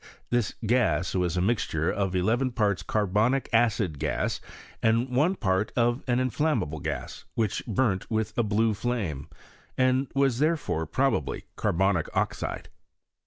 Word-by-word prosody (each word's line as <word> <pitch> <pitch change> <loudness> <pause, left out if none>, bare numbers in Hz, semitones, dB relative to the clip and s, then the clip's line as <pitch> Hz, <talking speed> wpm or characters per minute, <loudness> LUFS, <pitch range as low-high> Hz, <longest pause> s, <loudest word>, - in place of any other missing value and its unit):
This 120 -3 +1
gas 100 -8 +2
was 90 -1 0
a - - +2
mixture 90 -6 0
of 95 -2 -1
eleven 120 +8 +1
parts 105 -6 +1
carbonic 110 +6 +1
acid 110 - +2
gas, 75 +1 -1 0.4
and 115 +3 +2
one 160 +9 +3
part 95 - 0
of 120 +1 +2
an 120 -1 +2
inflam 145 +5 +1
mable 75 +1 -3
gas, - - -5
which 110 -3 0
burnt 105 -3 0
with 110 -1 -1
a - - +2
blue 110 +1 +2
flame, 95 - -3 0.5
and 130 +1 +2
was 135 -3 +2
therefore 150 - 0
probably 80 - 0
carbonic 95 -2 +1
oxide. - - -2
110 Hz, 140 wpm, -27 LUFS, 95-125 Hz, 0.5 s, one